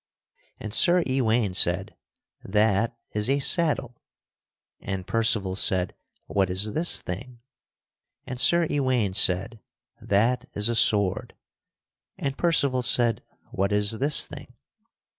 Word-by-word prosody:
And 110 Hz, -1 st, -7 dB
Sir 175 Hz, +6 st, +4 dB
Ewaine 120 Hz, -6 st, 0 dB
said, 90 Hz, +1 st, 0 dB, 0.5 s
"That 105 Hz, +2 st, 0 dB, 0.2 s
is 105 Hz, +3 st, -2 dB
a 140 Hz, -, +2 dB
saddle." 140 Hz, -4 st, +1 dB, 0.8 s
And 95 Hz, -2 st, -6 dB
Percival 105 Hz, -4 st, 0 dB
said, 95 Hz, -2 st, 0 dB, 0.3 s
"What 95 Hz, -2 st, -1 dB
is 100 Hz, +4 st, -1 dB
this 170 Hz, +2 st, -1 dB
thing?" 120 Hz, +6 st, -8 dB, 0.8 s
And 125 Hz, -1 st, -6 dB
Sir 170 Hz, +7 st, +4 dB
Ewaine 130 Hz, -9 st, -1 dB
said, 95 Hz, +4 st, +2 dB, 0.4 s
"That 115 Hz, +5 st, 0 dB
is 105 Hz, +2 st, 0 dB
a 120 Hz, -, -1 dB
sword." 100 Hz, -4 st, +1 dB, 0.8 s
And 135 Hz, -1 st, -4 dB
Percival 140 Hz, -7 st, 0 dB
said, 120 Hz, -2 st, +2 dB, 0.3 s
"What 100 Hz, +1 st, -2 dB
is 105 Hz, +1 st, 0 dB
this 140 Hz, +2 st, +4 dB
thing?" -, -, -12 dB
115 Hz, 120 wpm, -24 LUFS, 100-130 Hz, 0.8 s, Sir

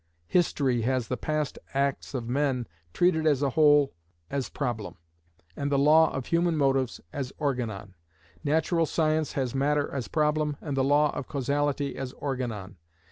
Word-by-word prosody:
History 140 Hz, -8 st, +1 dB
has 125 Hz, 0 st, 0 dB
the 125 Hz, -, 0 dB
past 150 Hz, +3 st, -2 dB, 0.2 s
acts 140 Hz, 0 st, -1 dB
of 120 Hz, -3 st, -3 dB
men 130 Hz, -1 st, 0 dB, 0.3 s
treated 160 Hz, -, +2 dB
as 145 Hz, -2 st, +3 dB
a 140 Hz, -, +1 dB
whole 145 Hz, -1 st, +5 dB, 0.4 s
as 140 Hz, -2 st, -2 dB
problem, 120 Hz, -7 st, -3 dB, 0.6 s
and 140 Hz, 0 st, -2 dB
the 140 Hz, -, +3 dB
law 155 Hz, +3 st, +5 dB
of 135 Hz, -2 st, -4 dB
human 170 Hz, -1 st, +1 dB
motives 135 Hz, -3 st, +1 dB
as 135 Hz, -2 st, -4 dB
organon. 115 Hz, -9 st, -3 dB, 0.5 s
Natural 160 Hz, +2 st, +1 dB
science 155 Hz, -1 st, +1 dB
has 130 Hz, -3 st, -1 dB
matter 145 Hz, +2 st, +1 dB
as 135 Hz, -4 st, -3 dB
problem, 150 Hz, -1 st, +1 dB
and 145 Hz, -3 st, -4 dB
the 135 Hz, -, +2 dB
law 145 Hz, +2 st, +3 dB
of 130 Hz, -, -4 dB
causality 140 Hz, 0 st, -1 dB
as 135 Hz, -1 st, -5 dB
organon. 115 Hz, -9 st, -4 dB
140 Hz, 155 wpm, -27 LUFS, 130-150 Hz, 0.6 s, whole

